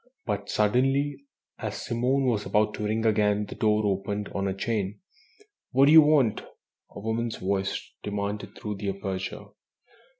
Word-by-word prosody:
But 105 -3 -3
suddenly, 135 +6 +1 0.3
as - - -4
Simone 125 +3 +1
was 115 -5 +1
about 105 0 +2
to 105 - -4
ring 110 +2 0
again, 105 -1 +2
the - - -8
door 105 0 +1
opened 100 +1 -1
on 100 0 -2
a 95 - -1
chain. 105 -1 -2 0.7
"What 135 +2 +6
do 145 - +5
you 160 0 +10
want?" 145 -7 +3 0.5
a - - -10
woman's 110 +2 -2
voice 95 +1 -2
demanded 105 0 -4
through 105 -2 -5
the 100 0 -3
aperture. 95 -1 -4
105 Hz, 155 wpm, -27 LUFS, 100-120 Hz, 0.7 s, you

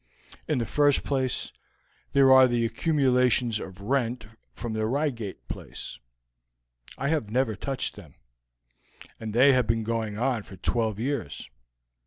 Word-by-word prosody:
In 155 - +1
the 120 - 0
first 145 +3 +3
place, 130 -3 -1 0.6
there 135 -1 +6
are 130 0 +8
the 120 -1 +1
accumulations 125 -4 +2
of 95 0 -9
rent 120 0 -1 0.3
from 120 -2 -6
the 110 0 -1
Reigate 120 -6 -3
place. - - -7 1.0
I 140 +2 -1
have 150 -10 0
never 120 -1 +1
touched 135 +5 -2
them, - - -13 1.0
and 110 -1 -5
they 130 +5 +6
have 125 -3 +2
been 115 0 +1
going 110 -2 -2
on 125 -1 0
for 95 -1 -13
twelve 110 -1 -1
years. 125 - -3
120 Hz, 140 wpm, -27 LUFS, 110-135 Hz, 1.0 s, are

